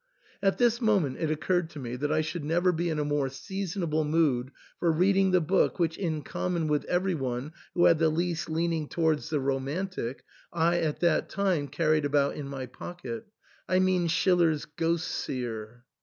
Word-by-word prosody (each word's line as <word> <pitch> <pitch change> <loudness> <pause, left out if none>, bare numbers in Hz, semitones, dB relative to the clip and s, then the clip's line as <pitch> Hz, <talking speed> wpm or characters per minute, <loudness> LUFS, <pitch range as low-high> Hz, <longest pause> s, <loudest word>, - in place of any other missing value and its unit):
At 195 -1 +2
this 240 0 +3
moment 195 - +2
it 160 - 0
occurred 160 +2 0
to 155 - -9
me 125 -2 -5
that 145 +4 -2
I 155 0 +3
should 155 +1 -4
never 175 +4 +2
be 170 0 -1
in 155 - -1
a 150 - 0
more 145 -2 0
seasonable 170 +2 -2
mood 150 -5 +1 0.3
for 170 - +3
reading 190 +4 +3
the 185 -1 +4
book 185 +4 +2
which, 165 -2 +1
in 160 -6 -2
com 180 - -3
mon 165 -2 0
with 150 -1 0
every 185 +1 +1
one 135 0 -3 0.2
who 175 - +4
had 165 - +5
the 165 -1 +4
least 170 +1 -1
leaning 165 -1 0
towards 160 -3 0
the 155 -2 0
romantic, 135 +1 -2 0.3
I 170 +1 +2
at 155 -3 -1
that 170 -2 +2
time 185 -7 0
carried 155 -1 +1
about 140 -1 +2
in 145 - -5
my 135 -2 -5
pocket, 180 - -7 0.2
— - - -28
I 185 - +3
mean 185 -2 +2
Schiller's 170 -3 +2
"Ghost 165 +2 -1
seer." 120 -2 -4
160 Hz, 190 wpm, -28 LUFS, 145-180 Hz, 0.3 s, had